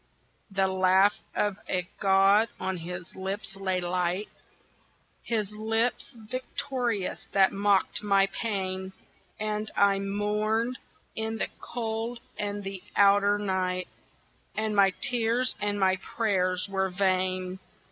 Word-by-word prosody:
The 195 -1 +1
laugh 190 +2 +4 0.2
of 205 -1 0
a 180 -1 0
god 195 +3 +5
on 190 -1 -2
his 175 +1 -7
lips 195 +2 -4
lay 190 -1 -1
light 180 +2 -1 0.9
His 210 -3 -1
lips 225 +5 0
victorious 240 -2 -3
that 195 -1 +5
mocked 200 0 +3
my 200 -2 +4
pain, 190 -2 -3 0.5
And 215 0 -2
I 200 -1 +4
mourned 210 +4 0 0.4
in 220 0 -2
the - - -1
cold 230 0 -3 0.2
and 205 -1 -3
the 195 -1 -5
outer 200 0 +5
night, 185 -2 -1 0.7
And 215 -1 -1
my 200 -1 +6
tears 245 +1 +2
and 205 0 0
my 190 -1 +3
prayers 185 -3 0
were 190 -1 0
vain. 185 0 0
200 Hz, 115 wpm, -28 LUFS, 190-215 Hz, 0.9 s, my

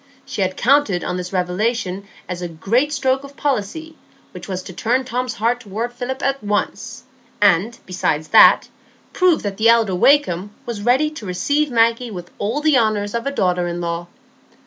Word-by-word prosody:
She - - -4
had 185 -1 -1
counted 255 -9 +2
on 180 - -3
this 180 0 -5
revelation 195 +1 -2 0.2
as 180 -1 -5
a 175 - -3
great 230 - 0
stroke 265 -2 0
of 280 0 -12
policy, 290 +5 -3 0.4
which - - -10
was 185 -2 -4
to 185 - -9
turn 245 +7 0
Tom's 250 -1 -3
heart 235 +3 0
toward 230 +2 -5
Philip 255 +2 -5
at 275 -2 -1
once, 205 0 -3 0.4
and, 205 +4 +3
besides 160 -4 -2
that, - - +7 0.5
prove 365 -4 +3
that 200 -2 -4
the 225 +1 +4
elder 230 -4 +4
Wakem 200 -3 +3 0.2
was 235 -4 -5
ready 260 +7 +2
to 230 -10 -9
receive 285 +12 0
Maggie 230 0 +2
with 175 -4 -8
all 225 +9 -1
the 300 -4 +4
honours 210 -2 0
of 235 +3 -2
a - - 0
daughter 180 -8 0
in 175 0 -4
law. 170 0 -3
225 Hz, 180 wpm, -20 LUFS, 185-260 Hz, 0.5 s, that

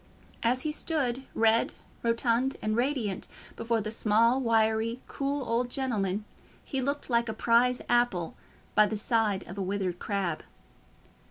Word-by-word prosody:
As 250 +2 +2
he 305 - -1
stood, 270 -5 -1
red, 225 0 +3 0.3
rotund, 235 +2 +1
and 215 0 -1
radiant, 240 -6 -1 0.3
before 230 0 0
the 215 +1 -3
small, 230 +4 +3
wiry, 225 0 +2
cool 275 -1 -3
old 240 +2 0
gentleman, 215 -7 -1 0.4
he 270 -2 -2
looked 280 +2 -2
like 235 -2 +1
a - - -2
prize 240 +3 +2
apple 240 -8 +1 0.4
by 215 - +5
the 215 - -2
side 215 -3 +1
of 190 +3 -7
a - - -1
withered 190 -2 -2
crab. 190 -6 -2
230 Hz, 145 wpm, -29 LUFS, 215-250 Hz, 0.4 s, by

